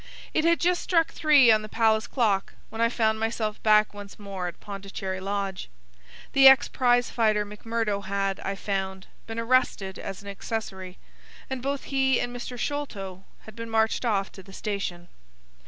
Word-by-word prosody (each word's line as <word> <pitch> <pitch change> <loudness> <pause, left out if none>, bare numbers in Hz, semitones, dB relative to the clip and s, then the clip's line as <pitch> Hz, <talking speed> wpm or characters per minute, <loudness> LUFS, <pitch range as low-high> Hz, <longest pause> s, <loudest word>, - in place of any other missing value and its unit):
It 315 - +1
had 335 0 +4
just 355 0 +2
struck 330 -3 +2
three 290 -7 +6
on 215 -1 +4
the 215 - -8
Palace 220 -1 +2
clock 210 -6 0
when 225 +1 -5
I 230 - +4
found 220 -2 +1
myself 220 -1 -2
back 215 -1 +4
once 205 -1 -10
more 195 -3 -5
at 175 - -8
Pondicherry 195 -1 -6
Lodge. 195 -1 -3 0.6
The 270 0 +8
ex 265 -1 +7
prize 245 -1 +2
fighter 215 -3 +2
McMurdo 210 -1 -3
had, 195 0 -1
I 195 - -3
found, 190 -1 -3 0.2
been 225 0 -6
arrested 230 -5 +1
as 195 +1 -7
an - - -12
accessory, 190 -2 -5 0.5
and 260 -1 -3
both 275 +1 -2
he 265 -2 +2
and 245 0 -3
Mr. 245 0 -6
Sholto 200 -10 -4 0.2
had 220 - -13
been 230 0 -7
marched 220 +1 +1
off 200 -5 0
to 190 - -12
the 195 0 -15
station. 190 -4 -4
215 Hz, 170 wpm, -26 LUFS, 195-245 Hz, 0.6 s, The